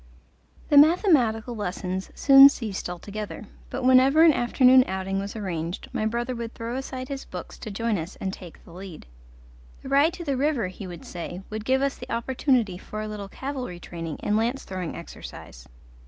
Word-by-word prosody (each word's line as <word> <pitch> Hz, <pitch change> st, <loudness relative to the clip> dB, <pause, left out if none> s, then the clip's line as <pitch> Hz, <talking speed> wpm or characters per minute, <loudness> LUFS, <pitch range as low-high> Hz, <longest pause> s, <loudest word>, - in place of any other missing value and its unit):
The 290 Hz, -, +5 dB
mathematical 280 Hz, -, +3 dB
lessons 190 Hz, -2 st, -4 dB
soon 275 Hz, 0 st, +9 dB
ceased 215 Hz, -10 st, -5 dB
altogether, 205 Hz, +5 st, -6 dB, 0.2 s
but -, -, -4 dB
whenever 260 Hz, +4 st, +6 dB
an 325 Hz, -2 st, +7 dB
afternoon 255 Hz, +1 st, +5 dB
outing 190 Hz, +1 st, -2 dB
was 200 Hz, +2 st, -5 dB
arranged 175 Hz, -4 st, -4 dB
my 215 Hz, -, 0 dB
brother 240 Hz, +3 st, -2 dB
would 235 Hz, -1 st, -6 dB
throw 230 Hz, +1 st, -5 dB
aside 260 Hz, -1 st, -5 dB
his 275 Hz, 0 st, -5 dB
books 180 Hz, -1 st, -8 dB
to -, -, -7 dB
join 215 Hz, 0 st, -1 dB
us 165 Hz, +5 st, -7 dB
and 190 Hz, -1 st, -4 dB
take 180 Hz, -4 st, -11 dB
the 170 Hz, -, -14 dB
lead. 185 Hz, -2 st, -10 dB, 0.8 s
The -, -, -7 dB
ride 285 Hz, +4 st, +4 dB
to 345 Hz, -, -7 dB
the 280 Hz, -4 st, -1 dB
river, 265 Hz, -8 st, 0 dB
he 185 Hz, +1 st, -9 dB
would 175 Hz, -2 st, -9 dB
say, 175 Hz, +1 st, -7 dB
would 215 Hz, 0 st, -5 dB
give 265 Hz, +2 st, +2 dB
us 275 Hz, 0 st, -1 dB
the -, -, -9 dB
opportunity 235 Hz, -5 st, 0 dB
for 215 Hz, -, -7 dB
a -, -, -5 dB
little 205 Hz, -2 st, -6 dB
cavalry 255 Hz, -8 st, -5 dB
training 165 Hz, -3 st, -6 dB
and 210 Hz, -, +1 dB
lance 235 Hz, +5 st, 0 dB
throwing 185 Hz, -3 st, -5 dB
exercise. 60 Hz, -, -10 dB
220 Hz, 185 wpm, -25 LUFS, 190-265 Hz, 0.8 s, soon